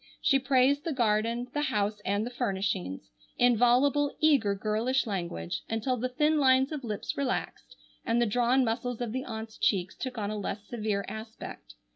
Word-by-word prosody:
She 275 Hz, -, +3 dB
praised 270 Hz, +1 st, +3 dB
the 330 Hz, -, -2 dB
garden, 230 Hz, 0 st, +1 dB
the 295 Hz, -, 0 dB
house 210 Hz, -6 st, -1 dB
and 200 Hz, +2 st, 0 dB
the 245 Hz, -, -5 dB
furnishings, 190 Hz, -, -2 dB, 0.3 s
in 245 Hz, 0 st, +5 dB
voluble, 270 Hz, +5 st, +3 dB
eager, 270 Hz, -10 st, +3 dB
girlish 220 Hz, +7 st, 0 dB
language 170 Hz, -, -3 dB
until 225 Hz, +3 st, 0 dB
the 250 Hz, +1 st, -2 dB
thin 300 Hz, +4 st, +2 dB
lines 265 Hz, 0 st, +4 dB
of 295 Hz, -3 st, -4 dB
lips 215 Hz, -4 st, -4 dB
relaxed 275 Hz, -2 st, -3 dB, 0.3 s
and 230 Hz, +1 st, +1 dB
the 240 Hz, -, +3 dB
drawn 245 Hz, +4 st, +2 dB
muscles 240 Hz, +1 st, -2 dB
of 240 Hz, -3 st, -3 dB
the 260 Hz, +2 st, -3 dB
aunts' 220 Hz, -1 st, -7 dB
cheeks 190 Hz, -2 st, +1 dB
took 255 Hz, -2 st, -5 dB
on 205 Hz, -1 st, -2 dB
a 215 Hz, -, -3 dB
less 205 Hz, +1 st, -4 dB
severe 215 Hz, -4 st, -2 dB
aspect. 220 Hz, -, -8 dB
235 Hz, 175 wpm, -29 LUFS, 210-260 Hz, 0.3 s, in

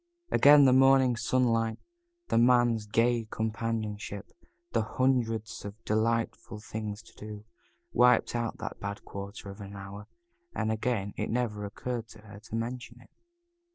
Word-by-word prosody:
Again 145 Hz, 0 st, +7 dB
the 130 Hz, -, +6 dB
morning 135 Hz, -1 st, +5 dB
sunlight, 115 Hz, -2 st, +1 dB, 0.5 s
the -, -, +3 dB
Man's 120 Hz, -3 st, +4 dB
gay 115 Hz, +1 st, +2 dB
companionship, 110 Hz, -2 st, -3 dB, 0.4 s
the -, -, +2 dB
hundreds 115 Hz, -4 st, 0 dB
of 100 Hz, 0 st, -7 dB
delightful 110 Hz, 0 st, -1 dB
things 105 Hz, 0 st, -6 dB
to -, -, -18 dB
do, 105 Hz, 0 st, -9 dB, 0.5 s
wiped 125 Hz, 0 st, +4 dB
out 120 Hz, -1 st, -2 dB
that 110 Hz, -, -6 dB
bad 100 Hz, 0 st, -6 dB
quarter 100 Hz, 0 st, -7 dB
of 100 Hz, +2 st, -11 dB
an 100 Hz, 0 st, -8 dB
hour, 100 Hz, +1 st, -9 dB, 0.5 s
and 110 Hz, -, 0 dB
again 110 Hz, -3 st, -1 dB
it -, -, -2 dB
never 110 Hz, -4 st, -1 dB
occurred 115 Hz, +3 st, -4 dB
to 110 Hz, -1 st, -15 dB
her 105 Hz, -2 st, -12 dB
to 110 Hz, +1 st, -8 dB
mention 120 Hz, +1 st, -5 dB
it. 125 Hz, -, -20 dB
115 Hz, 145 wpm, -29 LUFS, 105-120 Hz, 0.5 s, Again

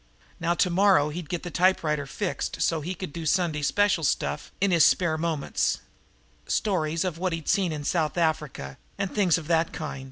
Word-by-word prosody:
Now 170 Hz, +1 st, +1 dB
tomorrow 180 Hz, -3 st, +3 dB
he'd 160 Hz, 0 st, -6 dB
get 175 Hz, -, -3 dB
the 175 Hz, -, -6 dB
typewriter 160 Hz, -6 st, +1 dB
fixed 190 Hz, +6 st, -3 dB
so 165 Hz, -2 st, +1 dB
he 180 Hz, +5 st, -4 dB
could 180 Hz, -4 st, -7 dB
do 170 Hz, -, -5 dB
Sunday 170 Hz, -4 st, +1 dB
special 170 Hz, +5 st, +2 dB
stuff 150 Hz, +1 st, -1 dB
in 200 Hz, -1 st, +2 dB
his 165 Hz, -3 st, +5 dB
spare 170 Hz, -1 st, +3 dB
moments 160 Hz, -3 st, -1 dB, 0.7 s
stories 165 Hz, -6 st, 0 dB
of 170 Hz, -3 st, -3 dB
what 185 Hz, -1 st, -1 dB
he'd 165 Hz, -2 st, -5 dB
seen 190 Hz, -4 st, +2 dB
in 150 Hz, -2 st, -4 dB
South 160 Hz, +1 st, 0 dB
Africa 150 Hz, -, -1 dB, 0.2 s
and 200 Hz, -2 st, -3 dB
things 190 Hz, -6 st, +3 dB
of 165 Hz, -, -7 dB
that 165 Hz, 0 st, +1 dB
kind. 155 Hz, -3 st, -5 dB
165 Hz, 185 wpm, -26 LUFS, 155-185 Hz, 0.7 s, his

